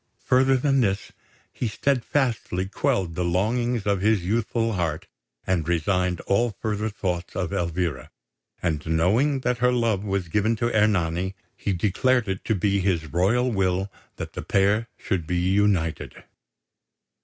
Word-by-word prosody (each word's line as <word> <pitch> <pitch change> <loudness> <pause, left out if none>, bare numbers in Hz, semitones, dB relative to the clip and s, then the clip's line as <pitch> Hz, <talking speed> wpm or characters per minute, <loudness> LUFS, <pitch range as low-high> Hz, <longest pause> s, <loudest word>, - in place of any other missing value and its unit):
Further 130 +1 +4
than 135 0 +2
this, 100 -4 -1 0.4
he 120 - -2
steadfastly 120 -6 0
quelled 95 -3 0
the 90 - -2
longings 110 +6 0
of 100 -2 +1
his 105 -2 +2
youthful 115 +2 0
heart, 85 -5 -2 0.4
and 85 -4 0
resigned 90 +1 0
all 105 +1 0
further 110 0 -1
thoughts 90 -4 -3
of 95 0 -2
Elvira; 85 -2 -2 0.5
and 80 -4 0
knowing 110 - +2
that 125 -1 0
her 125 0 +3
love 115 -5 +1
was 100 -3 -2
given 105 +7 +1
to 120 +1 -1
Ernani, 95 -3 +1 0.2
he 100 - -2
declared 110 +7 +1
it 95 0 -3
to 110 - +1
be 100 +1 +1
his 85 -6 -1
royal 115 +9 +2
will 95 -1 0 0.2
that - - -7
the - - -5
pair 100 +3 +2
should 85 -6 -2
be 90 - 0
united. 95 -2 0
100 Hz, 145 wpm, -24 LUFS, 90-115 Hz, 0.5 s, Further